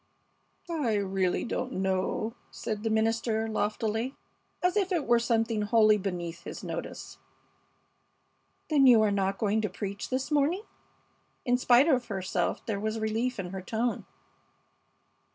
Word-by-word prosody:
"I 280 -10 0
really 190 -2 0
don't 255 +2 -3
know," 190 +4 -1 0.2
said 215 -2 -4
the 225 - -1
minister, 225 0 +1
loftily, 220 +3 -1 0.5
as 360 +1 +2
if 395 -2 +1
it 340 -5 0
were 240 0 +4
something 225 -2 +1
wholly 215 0 +4
beneath 175 -3 -4
his - - -7
notice. - - -6 1.5
"Then 280 -3 +6
you 230 -3 +7
are 210 - +2
not 195 -1 0
going 215 +1 +1
to 210 - -1
preach 200 +2 -5
this 265 +3 -2
morning?" 300 +7 +2 0.8
In 245 - +3
spite 250 +2 +5
of 255 -6 +2
herself 185 -3 -2
there 210 -3 -2
was 215 +2 -2
relief 225 +3 -1
in 180 -2 -4
her 190 -1 -5
tone. 225 +5 -2
220 Hz, 140 wpm, -29 LUFS, 200-245 Hz, 1.5 s, you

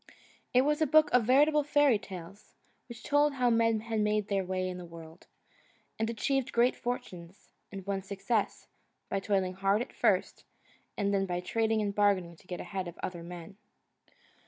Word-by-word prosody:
It 250 +1 +4
was 295 +2 +1
a 310 - +3
book 310 +2 +5
of 250 -3 +4
veritable 295 +4 +4
fairy 290 -5 +3
tales, 195 0 -11 0.3
which 235 -1 -10
told 290 0 +3
how 250 -3 +2
men 230 -1 +2
had 225 0 -2
made 210 0 0
their 195 -1 +1
way 185 0 -2
in 180 0 -5
the - - -8
world, 165 0 -13 0.7
and 225 0 0
achieved 265 +3 -1
great 240 +2 +3
fortunes, 200 -6 -6 0.2
and 195 -2 -8
won 200 -1 -2
success, 200 +3 -2 0.4
by 195 - 0
toiling 190 -2 0
hard 195 +2 +1
at 245 - -5
first, - - +1 0.5
and 200 0 0
then 195 -1 +1
by 175 -1 -2
trading 220 +4 0
and 200 -1 -2
bargaining 200 -4 +2
and 170 - -17
getting 180 - -6
ahead 190 -3 -4
of 170 - -9
other 175 -2 -4
men. 175 +2 -9
205 Hz, 180 wpm, -30 LUFS, 185-240 Hz, 0.7 s, book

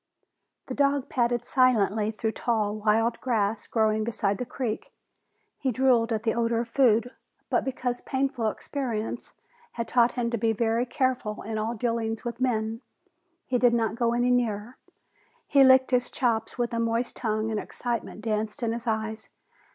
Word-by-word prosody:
The - - -5
dog 280 -1 +1
padded 240 -1 0
silently 220 -5 +3
through 220 0 -2
tall, 220 -3 0
wild 225 +2 +1
grass 220 -4 0
growing 220 -1 +1
beside 205 -3 -1
the 250 - -3
creek. 240 -4 -4 0.7
He 265 - 0
drooled 245 -2 +3
at 220 -1 -1
the 225 - +1
odor 230 0 +1
of 235 - -6
food, 245 -2 +3 0.4
but - - +2
because 250 -2 -3
painful 265 -4 -1
experience 235 -2 -4 0.4
had 230 -1 -3
taught 240 0 +3
him 235 -1 -1
to 235 - -1
be 225 +1 +2
very 230 +2 0
careful 250 -4 -1
in 220 0 -3
all 225 +2 -2
dealings 230 0 -2
with 240 +1 -5
men, 225 -2 0 0.6
he 250 -1 0
did 240 -1 +4
not 225 -2 +1
go 235 0 +1
any 245 +1 +2
nearer. 235 -1 -1 0.7
He 280 -2 +5
licked 260 0 +6
his 245 -1 +2
chops 230 -5 -1
with 240 -1 -1
a 230 - 0
moist 230 +1 -1
tongue 220 -1 -1
and 215 - -1
excitement 235 -2 -4
danced 215 0 -2
in 225 - +1
his 235 +1 -6
eyes. 220 0 -2
235 Hz, 165 wpm, -27 LUFS, 220-245 Hz, 0.7 s, licked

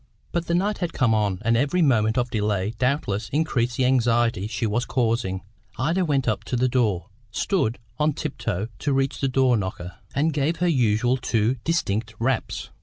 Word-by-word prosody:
But 170 -1 -2
the 170 - +1
night 205 +4 0
had 175 -2 -2
come 120 -4 +2
on, 105 -3 +1
and 115 +1 +3
every 145 +8 +2
moment 110 -5 +3
of 120 -1 0
delay 105 -1 0
doubtless 125 -5 0
increased 125 -6 0
the 130 - +2
anxiety 120 -5 +2
she 110 +1 -2
was 110 +3 0
causing. 115 -7 -1 0.3
Ida 165 +9 +1
went 140 -5 0
up 110 - 0
to - - -2
the 125 +1 +2
door, 110 -8 0 0.2
stood 120 - 0 0.2
on 150 0 +2
tiptoe 115 - -3
to 145 - 0
reach 135 0 0
the 135 - +1 0.3
knocker, 90 -2 -5 0.2
and 155 +3 +2
gave 150 +3 +1
her 180 - +1
usual 125 -4 +2
two 120 0 0
distinct 110 -10 -1
raps. 125 +1 -2
120 Hz, 180 wpm, -24 LUFS, 110-140 Hz, 0.3 s, and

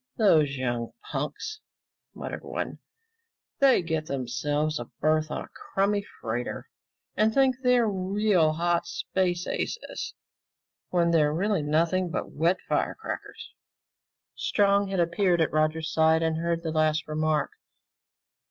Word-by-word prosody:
"Those 155 - +4
young 120 -2 -2 0.2
punks," 430 0 -4 0.6
muttered - - -6
one, - - -4 0.8
"they 270 -9 +5
get 160 -2 -2
themselves 145 +4 -1
a 120 - -5
berth 155 0 +2
on - - -3
a - - -14
crummy 200 +1 -1 0.2
freighter 120 +2 -4 0.5
and 215 +1 +3
think 260 +1 +3
they're 250 -3 +4
real 190 -4 +2
hot 170 +1 0
space 180 -1 -1
aces 460 -1 -4 0.7
when 170 -1 +2
they're 165 +5 +2
nothing 165 +5 +1
but - - -4
wet 170 +5 +2
fire - - 0
crackers!" 440 - -7 0.8
Strong 200 -1 +2
had 195 -1 -2
appeared 175 +1 +2
at 160 - +1
Roger's 155 +1 0
side 160 0 +4
and 160 -1 +1
heard 170 0 -1
the 160 - -2
last 155 -1 +1
remark. 155 -1 0
165 Hz, 125 wpm, -27 LUFS, 155-195 Hz, 0.8 s, they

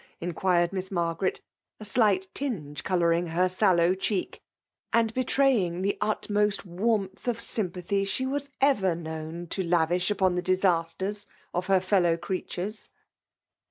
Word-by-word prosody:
inquired 175 +1 +1
Miss 190 0 -3
Margaret^ 170 0 -1 0.4
a 215 - -8
slight 205 -3 +2
tinge 150 - -4
colouring 170 -2 +2
her 175 +3 +2
sallow 185 -2 +3
cheek> 190 0 -2 0.5
and 230 -1 +2
betraying 245 -9 +2
the 200 - 0
utmost 210 -1 0
warmth 195 +2 -1
of 235 -2 0
sympathy 195 -2 -2
she 200 +7 -1
was 280 +1 -2
ever 205 -11 +3
known 160 +1 -6
to 190 - -1
lavish 175 +1 +1
upon 190 -3 +2
the 180 - 0
disasters 185 +2 0 0.3
of 180 +1 -2
her 195 -1 +4
fel 185 +1 +2
low 170 -1 +2
creatures. 185 +4 -5
185 Hz, 135 wpm, -27 LUFS, 175-210 Hz, 0.5 s, her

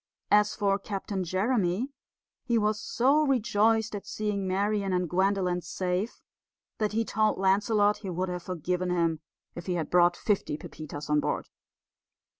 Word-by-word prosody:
As 210 0 +4
for 200 -2 +1
Captain 195 -1 -4
Jeremy, 195 +4 0 0.5
he 235 -2 +1
was 210 -1 +1
so 275 +5 +2
rejoiced 225 -4 +2
at 200 -1 -6
seeing 205 -1 -2
Marian 200 +1 0
and 180 -1 +1
Gwendolen 185 0 +1
safe 180 +4 -3 0.6
that 210 -1 0
he 225 +1 +1
told 215 -1 +1
Lancelot 205 +2 +3
he 195 - -7
would 180 +1 -2
have 180 0 -4
forgiven 180 +1 -2
him 170 -3 +1 0.3
if 170 +1 -8
he 180 - 0
had 165 -3 -3
brought 175 0 +4
fifty 200 -8 0
Pepitas 155 -1 -8
on 150 0 +3
board. - - -2
195 Hz, 150 wpm, -28 LUFS, 180-210 Hz, 0.6 s, As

